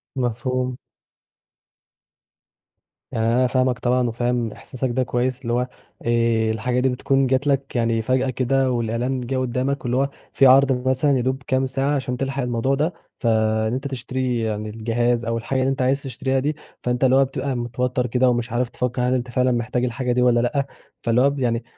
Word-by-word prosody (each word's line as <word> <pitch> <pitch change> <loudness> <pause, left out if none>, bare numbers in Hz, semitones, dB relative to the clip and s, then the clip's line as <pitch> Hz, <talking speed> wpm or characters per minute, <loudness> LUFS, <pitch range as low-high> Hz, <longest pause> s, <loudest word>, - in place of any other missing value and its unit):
مفهوم. 125 0 -1 2.3
يعني 110 - -1
أنا 125 +2 +3
فاهمك 130 0 +1
طبعًا، 125 0 +1
وفاهم 120 0 -1
إحساسك 130 +4 -4
ده 130 +2 0
كويس 125 +1 -1
اللي 120 -2 -2
هو 125 +1 +1 0.4
آآ، 115 -1 +2
الحاجة 125 +3 -1
دي 130 +1 +2
بتكون 135 +1 +1
جات 130 +3 +1
لك 135 -1 0
يعني 115 -1 +1
فجأة 130 +3 +1
كده 130 +1 +1
والإعلان 120 +2 -1
جه 130 +1 -1
قدّامك 130 +2 -1
واللي 120 +1 0
هو 140 +1 +1 0.2
في 135 - +4
عرْض 130 -1 +4
مثلًا 135 +2 +3
يادوب 130 +1 -1
كام 130 0 +1
ساعة 135 +2 0
عشان 130 -2 -2
تلحق 135 +1 -2
الموضوع 125 +2 0
ده، 155 +5 0 0.3
فإن 110 -1 +1
أنت 130 +2 -2
تشتري 130 -1 -2
يعني 110 -1 -2
الجهاز 115 +2 0
أو 115 0 -1
الحاجة 130 +3 -2
اللي 130 +1 +2
أنت 135 -1 -1
عايز 135 +2 +1
تشتريها 135 0 -1
دي، 150 +3 -1 0.3
فأنت 125 +1 0
اللي 130 0 +5
هو 135 0 +5
بتبقى 135 0 -3
متوتّر 125 +1 -1
كده 125 +2 +2
ومش 120 -1 -1
عارف 120 0 0
تفكر 125 0 -2
هل 125 +1 +2
أنت 125 -1 -1
فعلًا 125 0 +2
محتاجة 120 +1 0
الحاجة 125 +1 -2
دي 125 +1 +2
والَّا 120 -1 +4
لأ، 130 +4 0 0.4
فاللي 115 +1 +2
هو 140 - +5
ب 140 0 -4
يعني 120 -2 0
125 Hz, 185 wpm, -22 LUFS, 120-130 Hz, 2.3 s, اللي